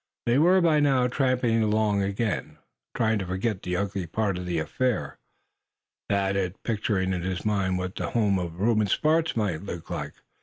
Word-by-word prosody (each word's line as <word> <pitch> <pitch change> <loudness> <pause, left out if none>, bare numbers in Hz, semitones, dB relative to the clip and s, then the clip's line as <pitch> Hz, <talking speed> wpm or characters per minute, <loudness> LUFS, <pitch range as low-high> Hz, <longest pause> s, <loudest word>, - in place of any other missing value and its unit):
They 120 +3 +3
were 180 +4 +5
by 160 -3 +4
now 135 -4 +3
tramping 125 -3 +1
along 105 -1 +2
again. 100 +1 -2 0.4
Trying 110 -1 +1
to 95 - -3
forget 95 +2 -2
the 90 - -3
ugly 95 -1 -2
part 100 +1 -1
of 90 - -6
the 85 -1 -1
affair, 110 +11 -1 0.9
Thad 100 -1 +1
was 95 -2 -1
picturing 100 -4 0
in 90 - -2
his 95 +2 -3
mind 100 -3 +1
what 90 0 -3
the - - -3
home 105 -5 +2
of 85 -1 -5
Reuben 110 0 +2
Sparks 160 +9 +2
might 100 -7 -1
be 90 -3 -5
like. - - -4
100 Hz, 180 wpm, -26 LUFS, 95-120 Hz, 0.9 s, were